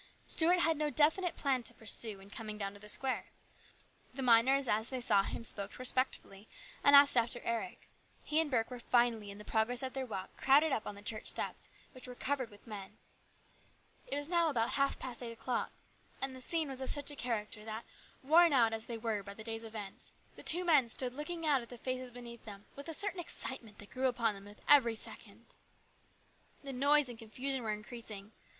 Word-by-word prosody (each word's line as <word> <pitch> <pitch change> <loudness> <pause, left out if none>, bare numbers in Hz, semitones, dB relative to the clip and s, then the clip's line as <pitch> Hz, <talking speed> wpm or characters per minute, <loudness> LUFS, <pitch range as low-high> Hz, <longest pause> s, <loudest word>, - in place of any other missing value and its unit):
Stuart 350 +2 +4
had 325 -2 +2
no 300 0 0
definite 320 +4 +2
plan 270 -3 0
to 235 - -4
pursue 220 -1 -1
in 195 +1 -15
coming 215 -1 -6
down 200 -1 -4
to 205 - -13
the 210 +1 -7
square. 265 +4 -2 0.9
The 270 - -3
miners 255 +3 +5
as 220 +2 +2
they 260 - -3
saw 215 -5 +4
him 195 - -5
spoke 200 -3 -2
respectfully, 250 -5 -1 0.4
and 285 - +7
asked 280 0 +9
after 240 0 +1
Eric. 225 -6 -4 0.4
He 305 - +1
and 320 - -2
Burke 235 -3 0
were 250 - -6
finally, 235 -3 +1
in 200 - -9
the 210 - -11
progress 235 +3 0
of 260 - -4
their 265 -1 -4
walk, 195 -4 -6
crowded 290 +3 +4
up 225 - -2
on 205 - -5
the 205 - -13
church 215 +1 -3
steps, - - -2 0.2
which 255 -1 -11
were 250 - -8
covered 260 -2 -2
with 205 0 -17
men. 200 -4 -9 1.1
It - - -3
was 290 0 -1
now 340 -1 +2
about 235 -5 0
half 275 0 +1
past 255 -2 -6
eight 235 -1 -5
o'clock, 245 +2 -3 0.5
and 265 -1 -3
the 260 - -9
scene 320 +3 -1
was 265 -1 -5
of 260 - -2
such 290 0 +6
a - - -9
character 215 -5 -4
that, 220 +1 -6 0.4
worn 330 +3 +5
as 225 -3 +2
they 235 - -5
were 220 -2 -2
by 200 0 -10
the 220 - -9
day's 225 0 -4
events, 215 -3 -8 0.2
the - - -11
two 355 +2 +7
men 300 -8 +4
stood 245 +2 +1
looking 330 +4 -5
out 285 -4 +3
at 235 - -12
the 245 - -9
faces 255 +1 -4
beneath 240 -1 -10
them 205 -2 -11
with 280 +3 -9
a - - -4
certain 400 0 -1
excitement 260 -9 -4
that 205 - -13
grew 260 0 0
upon 235 -3 0
them 195 0 -11
with 205 +1 -15
every 245 -6 +6
second. - - -9 1.1
The 275 -1 -6
noise 285 +2 +4
and 240 -2 -8
confusion 255 +4 -3
were 220 -2 -2
increasing. 215 -1 -7
245 Hz, 210 wpm, -33 LUFS, 220-275 Hz, 1.1 s, asked